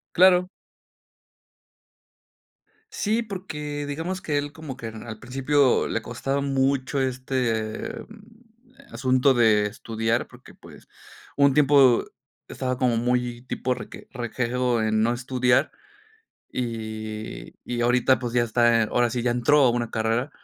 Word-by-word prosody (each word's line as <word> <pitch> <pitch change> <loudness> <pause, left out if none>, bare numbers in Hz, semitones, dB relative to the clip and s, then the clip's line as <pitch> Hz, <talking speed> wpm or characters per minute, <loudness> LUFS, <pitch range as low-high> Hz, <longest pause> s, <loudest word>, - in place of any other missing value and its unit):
Claro. 180 0 +5 2.4
Sí, 225 - 0
porque 150 -9 -5
digamos 165 +6 -4
que 150 -2 -1
él 145 0 -3
como 145 -4 -8
que 115 - -6
en 110 0 -9
al 110 -2 -8
principio 135 +2 +2
le 115 - -2
costaba 135 +4 -3
mucho 135 0 0
este 125 -4 -2 1.0
asunto 130 +1 +2
de 110 -4 +4
estudiar 115 +2 -2
porque, - - -16
pues, - - -16 0.5
hubo 140 - +4
un 140 - +2
tiempo 140 -4 +5 0.4
estaba 130 -1 -3
como 125 -2 +1
muy 120 0 -1
tipo 130 0 -2
reque - - -10
rejego 125 -1 -1
en 110 0 +1
no 115 - +2
estudiar 125 0 +1 0.8
y, 110 -2 -5
y 120 -1 -3
ahorita, 125 +2 +3
pues, 120 -2 -4
ya 120 - +4
está, 120 0 +3
en 110 - -1
ahora 120 0 +2
sí, 120 +1 -3
ya 120 - +1
entró 125 +5 +3
a 125 - +5
una 120 -1 -2
carrera, 115 +5 -1
125 Hz, 135 wpm, -24 LUFS, 115-140 Hz, 2.4 s, Claro